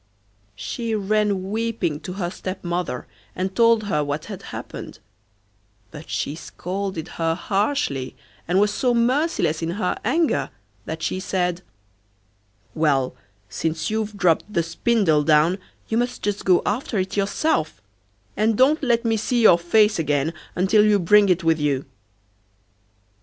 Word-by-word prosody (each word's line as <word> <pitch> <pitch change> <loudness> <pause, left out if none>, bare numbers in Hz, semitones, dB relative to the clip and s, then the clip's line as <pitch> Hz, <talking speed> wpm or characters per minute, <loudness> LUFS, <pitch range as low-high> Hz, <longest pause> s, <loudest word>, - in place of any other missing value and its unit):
She 230 - -3
ran 205 -2 0
weeping 220 -9 -1
to 180 - -7
her 180 -2 -3
stepmother, 180 -8 -4 0.3
and 190 +1 -3
told 230 -2 +4
her 150 -8 0
what 145 +1 -3
had - - -8
happened, - - -8 0.9
but 150 +1 -11
she 145 - -2
scolded 180 +1 -5
her 165 0 +1
harshly, 195 - -1 0.3
and 180 +3 +2
was 205 0 +2
so 245 -2 +1
merciless 235 - +1
in 165 - -2
her 185 -4 0
anger 310 +8 +1 0.4
that 160 0 -5
she 185 - -1
said: 180 -2 -1 1.1
'Well, 140 -5 +1 0.3
since 155 - -2
you've 215 -1 -2
dropped 180 +2 +2
the 170 -5 +1
spindle 170 -2 +2
down, 155 +5 +3 0.3
you 225 - 0
must 245 +1 -2
just 205 -1 -2
go 180 -2 +4
after 225 +1 -1
it 190 0 -2
yourself, 200 - 0 0.6
and 215 0 +1
don't 285 +5 +4
let 240 -3 +1
me 225 -1 +2
see 235 +2 0
your 175 -5 +7
face 210 +3 +3
again 150 0 0 0.2
until 195 +4 +4
you 210 -1 +4
bring 200 +2 +5
it 180 0 +2
with 165 -1 +2
you. 140 -2 0
190 Hz, 140 wpm, -22 LUFS, 165-220 Hz, 1.1 s, your